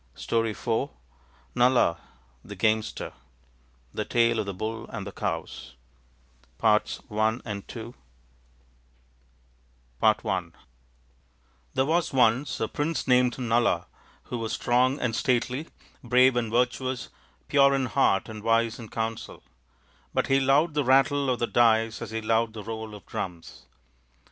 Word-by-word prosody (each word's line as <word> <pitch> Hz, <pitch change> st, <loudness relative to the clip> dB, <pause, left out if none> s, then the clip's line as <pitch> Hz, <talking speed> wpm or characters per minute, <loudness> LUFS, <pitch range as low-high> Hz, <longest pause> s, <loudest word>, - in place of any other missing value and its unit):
STORY 115 Hz, -1 st, 0 dB
IV 110 Hz, +1 st, -2 dB, 0.6 s
NALA 120 Hz, -9 st, +3 dB, 0.4 s
THE -, -, -9 dB
GAMESTER 110 Hz, 0 st, 0 dB, 0.8 s
The -, -, -2 dB
Tale 115 Hz, -1 st, +2 dB
of 105 Hz, -, -2 dB
the 100 Hz, -, -3 dB
"Bull 110 Hz, +4 st, -4 dB
and 105 Hz, -4 st, -6 dB
the 100 Hz, -, -6 dB
Cows -, -, -5 dB, 0.8 s
NALA 105 Hz, -1 st, +5 dB, 0.3 s
THE 110 Hz, +1 st, -3 dB, 2.1 s
GAMESTER 95 Hz, -5 st, +1 dB, 1.2 s
THERE 130 Hz, -, +2 dB
was 160 Hz, +1 st, 0 dB
once 125 Hz, +2 st, +2 dB
a 110 Hz, -, 0 dB
prince 150 Hz, +6 st, -2 dB
named 125 Hz, -1 st, +3 dB
Nala 120 Hz, -2 st, +1 dB, 0.4 s
who 120 Hz, -, -5 dB
was 115 Hz, -1 st, -3 dB
strong 130 Hz, +3 st, +2 dB
and 115 Hz, -3 st, -1 dB
stately, 125 Hz, +5 st, 0 dB, 0.4 s
brave 125 Hz, +1 st, +4 dB
and 115 Hz, -3 st, -1 dB
virtuous, 125 Hz, +1 st, 0 dB, 0.4 s
pure 140 Hz, -1 st, +5 dB
in 135 Hz, -1 st, 0 dB
heart 95 Hz, -4 st, +2 dB
and 110 Hz, -1 st, -8 dB
wise 115 Hz, +1 st, +1 dB
in 115 Hz, -2 st, -9 dB
counsel; 115 Hz, -, -4 dB, 0.7 s
but -, -, +2 dB
he 135 Hz, 0 st, +3 dB
loved 140 Hz, +4 st, +3 dB
the 145 Hz, -1 st, +1 dB
rattle 135 Hz, +2 st, +3 dB
of 125 Hz, -, +1 dB
the 120 Hz, -, 0 dB
dice 115 Hz, -1 st, +2 dB
as 115 Hz, -, -5 dB
he 110 Hz, 0 st, -3 dB
loved 115 Hz, 0 st, +1 dB
the 110 Hz, -2 st, -7 dB
roll 110 Hz, 0 st, -6 dB
of 105 Hz, -, -13 dB
drums. 85 Hz, -3 st, -7 dB
115 Hz, 130 wpm, -26 LUFS, 110-130 Hz, 2.1 s, NALA